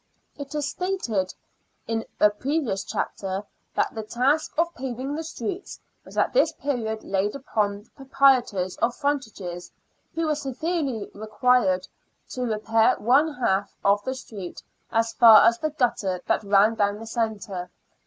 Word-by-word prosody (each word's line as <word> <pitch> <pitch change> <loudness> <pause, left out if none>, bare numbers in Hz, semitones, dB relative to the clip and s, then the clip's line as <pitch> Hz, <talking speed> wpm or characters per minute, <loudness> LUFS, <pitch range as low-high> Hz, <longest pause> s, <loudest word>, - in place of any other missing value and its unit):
It 285 +1 -8
is 295 -1 -1
stated 255 - -2 0.5
in 225 0 -2
a 210 - +6
previous 255 -2 -1
chapter* 195 0 -3 0.3
that - - +1
the 220 - -4
task 255 +8 +1
of 340 +1 +1
paving 260 +2 -4
the 320 +2 -3
streets 375 +4 -5 0.2
was - - -13
at - - +2
this - - +4
period 225 -6 -3
laid 195 +3 -1
upon 210 -6 -1
the - - -29
pro 275 - -12
prietors 245 -10 +3
of 235 +1 +1
frontages, 215 - -3 0.4
who 330 0 0
were 310 - +2
severally 280 - -3
required 215 -3 +1 0.4
to 255 - -5
repair 225 0 +2
one 275 +8 +3
half 200 -5 0
of 200 +1 +4
the 260 +3 -3
street 200 -8 -8 0.3
as 225 0 +1
far 225 -3 +8
as 230 0 +4
the 310 - 0
gutter 235 -10 0
that - - +1
ran 200 +2 +4
down 205 -2 0
the 225 - -9
centre. 215 -6 -3
230 Hz, 155 wpm, -25 LUFS, 205-275 Hz, 0.5 s, far